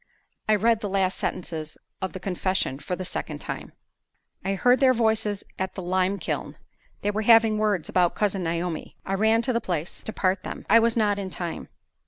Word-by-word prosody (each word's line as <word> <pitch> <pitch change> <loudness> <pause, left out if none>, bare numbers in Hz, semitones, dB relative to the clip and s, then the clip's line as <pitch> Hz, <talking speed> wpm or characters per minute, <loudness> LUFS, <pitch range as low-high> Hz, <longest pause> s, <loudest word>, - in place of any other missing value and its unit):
I 215 - +6
read 225 +1 +3
the 205 - -3
last 190 -1 +1
sentences 160 -3 -4 0.2
of 190 - -3
the 185 - -5
confession 185 -6 -1
for 180 +5 -3
the 185 - -5
second - - -4
time: - - -6 0.7
"...I 195 0 0
heard 245 +6 +4
their 260 -2 +5
voices 220 -3 +1 0.2
at 190 0 -2
the 190 - -5
lime 185 +2 +1
kiln. - - -4 0.5
They 205 - +1
were 210 +1 -1
having 225 -1 +5
words 205 -6 +1
about 180 -2 +2
Cousin 200 -3 0
Naomi. 170 0 -3
I 195 - -2
ran 220 +3 +3
to 255 - +1
the 235 - +1
place 170 -2 -3
to - - -4
part 185 -2 0
them. - - -7
I 230 +3 +7
was 230 0 +2
not 205 -2 +2
in 195 -1 -4
time. 175 -2 -5
195 Hz, 200 wpm, -25 LUFS, 185-220 Hz, 0.7 s, I